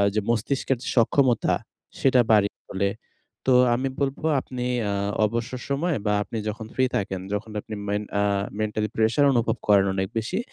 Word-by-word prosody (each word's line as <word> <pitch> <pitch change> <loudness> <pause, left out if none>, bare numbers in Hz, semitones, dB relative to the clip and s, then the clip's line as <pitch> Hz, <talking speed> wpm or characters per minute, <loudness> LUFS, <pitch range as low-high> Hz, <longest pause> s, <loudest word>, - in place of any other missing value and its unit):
যে 110 - +2
মস্তিষ্কের 120 +3 0 0.2
সক্ষমতা, 125 0 +3 0.5
সেটা 130 -2 +4
বাড়িয়ে 105 -2 +4
তোলে। 100 0 0 0.6
তো 130 - +5 0.2
আমি 130 +3 0
বলবো, 140 +2 -2
আপনি 125 -1 -6 0.3
আ - - 0 0.3
অবসর 120 +4 -3
সময় 150 +4 0
বা, 105 - +2
আপনি 115 - -6
যখন 110 +1 -6
ফ্রি 130 - +2
থাকেন, 95 -2 -2
যখন 105 +2 -3
আপনি 110 - -7
মেন 105 +1 -1 0.2
আ - - +3 0.4
মেন্টালি 110 0 -1
প্রেশার 115 +6 +3
অনুভব 115 -1 +1
করেন 100 -2 +5
অনেক 95 0 -1
বেশি, 115 - -1
115 Hz, 160 wpm, -25 LUFS, 105-130 Hz, 0.6 s, তো